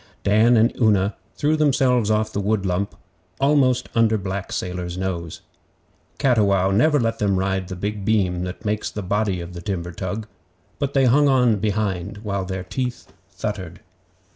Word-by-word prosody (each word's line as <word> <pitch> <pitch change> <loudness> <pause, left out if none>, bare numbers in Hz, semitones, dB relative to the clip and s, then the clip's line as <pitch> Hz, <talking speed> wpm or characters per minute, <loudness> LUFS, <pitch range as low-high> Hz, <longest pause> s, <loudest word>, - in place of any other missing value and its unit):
Dan 110 +4 +4
and 115 +2 +4
Una 100 -2 +3 0.2
threw 150 +1 +1
themselves 130 -7 +2
off 110 0 +1
the - - -1
wood 100 0 0
lump 95 +2 -1 0.4
almost 135 -3 +3
under 115 -1 +3
black 95 0 -4
Sailor's 90 -1 -4
nose. 85 -4 -4 0.8
Cattiwow 100 -7 +3
never 145 +9 +3
let 115 -2 -1
them 100 -2 +1
ride 95 0 -1
the 95 - -6
big 100 +2 -4
beam 95 -4 +1
that 90 +4 -8
makes 105 0 -1
the 105 - -6
body 100 -1 0
of 85 +1 -8
the 85 - -7
timber 90 -2 -3
tug, 95 +5 -4 0.5
but 140 -1 -2
they 135 -1 +4
hung 145 +4 +4
on 125 -5 +4
behind 100 -1 -2
while 100 -3 -2
their 95 0 -4
teeth 125 +6 -5 0.2
thuttered. - - -5
105 Hz, 165 wpm, -22 LUFS, 95-120 Hz, 0.8 s, Dan